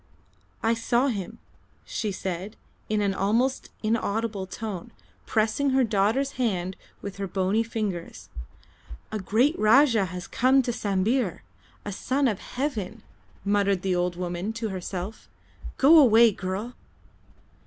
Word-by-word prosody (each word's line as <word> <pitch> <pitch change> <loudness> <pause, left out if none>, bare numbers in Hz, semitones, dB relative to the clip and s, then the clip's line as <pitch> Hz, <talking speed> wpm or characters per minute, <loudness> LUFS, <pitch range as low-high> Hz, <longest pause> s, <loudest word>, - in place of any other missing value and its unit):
"I 225 +1 +3
saw 240 +3 +1
him," 215 -1 -4 0.5
she 215 -3 -3
said, 190 +2 -5 0.3
in 215 -1 +1
an 200 -1 +1
almost 230 +8 0
inaudible 215 -2 -1
tone, 215 +2 -6 0.4
pressing 220 +6 +1
her 265 0 +3
daughter's 225 +6 +1
hand 185 -5 -1 0.3
with 200 -1 -6
her 200 -1 -3
bony 190 +4 +1
fingers. 210 -6 -4 0.8
"A 215 - -2
great 230 - +2
Rajah 225 -1 +5
has 180 0 -6
come 260 +2 +3
to 240 - -1
Sambir 205 +1 0 0.4
a 205 - -3
Son 265 +7 0
of 210 -5 -1
Heaven," 225 -6 -4 0.4
muttered 200 -2 +2
the 190 -2 +1
old 175 0 0
woman 180 +4 -3
to 225 -1 -3
herself. 185 +2 -6 0.5
"Go 310 +4 +7
away, 230 -4 +7
girl!" 195 +5 -4
215 Hz, 130 wpm, -26 LUFS, 190-235 Hz, 0.8 s, Go